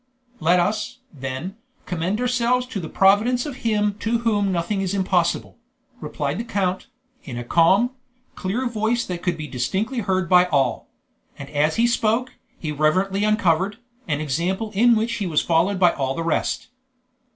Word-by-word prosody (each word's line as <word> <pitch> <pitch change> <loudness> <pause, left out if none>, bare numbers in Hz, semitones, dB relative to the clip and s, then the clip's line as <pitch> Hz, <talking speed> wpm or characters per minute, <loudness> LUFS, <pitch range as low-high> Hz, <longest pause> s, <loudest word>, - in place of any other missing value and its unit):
"Let 175 +2 +3
us, 210 +7 -1 0.2
then, 135 +8 -5 0.3
commend 180 +4 -2
ourselves 250 0 +1
to 250 -5 -5
the 160 -4 -6
providence 215 +6 +3
of 285 -4 -6
Him 210 -4 +1
to 230 +2 0
Whom 210 -4 +1
nothing 185 +3 -1
is 195 0 -1
impossible," 185 +2 0 0.4
replied 145 -2 -3
the - - -2
count, 190 -5 -2 0.4
in 125 -5 -7
a 120 - -4
calm, 190 - +3 0.4
clear 210 +7 -2
voice 230 +1 0
that 180 -2 -5
could 175 -2 -1
be 155 - -5
distinctly 190 - -2
heard 190 -4 0
by 180 +1 +6
all; 135 -8 0 0.5
and 140 0 -9
as 150 +1 +1
he 230 - +3
spoke, 235 +1 +1 0.3
he 155 - -4
reverently 185 +7 +1
uncovered, 200 -2 +2 0.3
an 150 -2 -1
example 180 - -2
in 235 +4 +5
which 225 +1 0
he 200 - -2
was 155 -3 +1
followed 175 +4 +2
by 175 -2 +5
all 135 -1 -2
the 165 - -3
rest. 165 +8 -1
190 Hz, 165 wpm, -22 LUFS, 165-220 Hz, 0.5 s, by